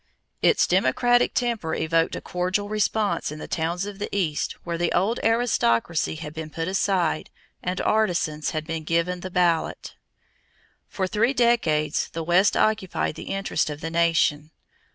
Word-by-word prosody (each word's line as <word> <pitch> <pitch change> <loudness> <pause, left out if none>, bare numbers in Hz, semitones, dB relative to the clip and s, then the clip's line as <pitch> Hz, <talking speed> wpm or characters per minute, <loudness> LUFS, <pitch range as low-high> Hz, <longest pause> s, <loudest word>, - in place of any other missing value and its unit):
Its 450 - +4
democratic 240 - +3
temper 230 -10 -1
evoked 165 +1 +1
a - - -5
cordial 185 +3 -2
response 210 -5 0
in 150 - -7
the - - -7
towns 170 +3 -2
of 205 -1 -8
the 205 - -3
East 170 -7 -1
where 170 0 -3
the 175 - +1
old 200 +6 +1
aristocracy 170 - +1
had 155 -1 -7
been 160 -1 -6
put 165 +1 -4
aside 185 -4 0 0.3
and 180 +1 -2
artisans 175 -8 +1
had 155 -1 -3
been 165 -1 -4
given 170 +3 0
the 185 - -6
ballot. 175 -3 0 1.0
For 190 - -2
three 230 +8 +1
decades 165 -12 +2
the 165 - -3
West 180 +4 +3
occupied 215 -7 0
the - - -9
interest 195 -5 -1
of 150 -1 -6
the 165 - -4
nation. 165 -3 +2
175 Hz, 155 wpm, -24 LUFS, 160-205 Hz, 1.0 s, Its